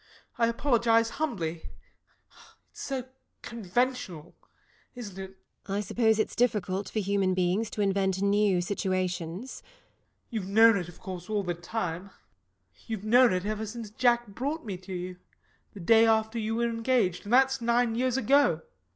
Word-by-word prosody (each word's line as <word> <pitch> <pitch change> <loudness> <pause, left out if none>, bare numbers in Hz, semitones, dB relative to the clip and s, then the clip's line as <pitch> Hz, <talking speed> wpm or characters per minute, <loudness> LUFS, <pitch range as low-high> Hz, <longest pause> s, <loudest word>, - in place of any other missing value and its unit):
I 230 - +4
apologise 230 -2 +2
humbly 170 - -3 1.0
it's - - -11
so 270 -2 -3 0.4
conventional. 225 -6 -2 0.6
Isn't 220 -6 -8
it? 195 - -6
LADY 190 - -21 0.3
TORMINSTER. 195 - -3
I - - 0
suppose 220 +2 +2
it's 215 - -1
difficult 205 -5 0
for - - -6
human 195 -2 +1
beings 185 +4 0
to 210 - -4
invent 195 -1 +1
new 200 -2 +2
situations. 185 +2 -2
SIR - - -9
GEOFFREY. - - -32
You've 215 -5 -3
known 225 +2 +6
it, 175 -2 -4
of 175 - -15
course, 180 -1 -8
all 210 -2 0
the 175 -1 -2
time; 175 0 -4 0.8
you've 220 -2 -4
known 245 +2 +6
it 180 +1 -1
ever 215 +1 -3
since 220 -1 -7
Jack 240 +1 +2
brought 280 +9 -4
me 200 -4 -4
to 185 +1 -12
you, 180 0 -5 0.6
the - - -8
day 225 +5 +5
after 220 +1 +1
you 220 0 -2
were 235 +1 +1
engaged. 230 -6 0
And 210 - -3
that's 265 0 +4
nine 235 0 +2
years 250 +2 0
ago. 275 +4 +3
215 Hz, 165 wpm, -28 LUFS, 185-235 Hz, 1.0 s, known